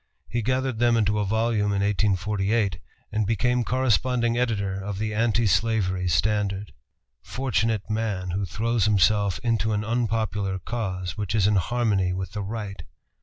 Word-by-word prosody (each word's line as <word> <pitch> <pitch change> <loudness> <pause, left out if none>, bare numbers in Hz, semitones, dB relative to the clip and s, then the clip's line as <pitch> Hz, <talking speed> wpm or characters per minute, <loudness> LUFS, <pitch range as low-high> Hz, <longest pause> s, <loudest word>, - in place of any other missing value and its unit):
He 120 - -2
gathered 130 0 -1
them 120 -1 +4
into 105 -1 +1
a 105 - 0
volume 110 0 +1
in 100 -1 0
1848, 100 -1 +1 0.3
and 110 0 0
became 125 +3 +1
corresponding 125 -1 +1
editor 100 -6 -1
of 100 -1 -4
the 110 +1 -2
Anti 115 +1 +2
Slavery 95 -3 +1
Standard. 100 +3 0 0.5
Fortunate 115 - -1
man 105 -5 -2
who 95 +2 -1
throws 110 +5 0
himself 105 -1 +3
into 115 -2 +1
an 105 +1 -1
unpopular 110 -4 -1
cause 95 -3 -4
which 105 0 -2
is 105 -3 +3
in 105 0 +3
harmony 100 -3 +1
with 95 0 -4
the 105 - -4
Right! 100 -1 -5
105 Hz, 150 wpm, -25 LUFS, 100-115 Hz, 0.5 s, them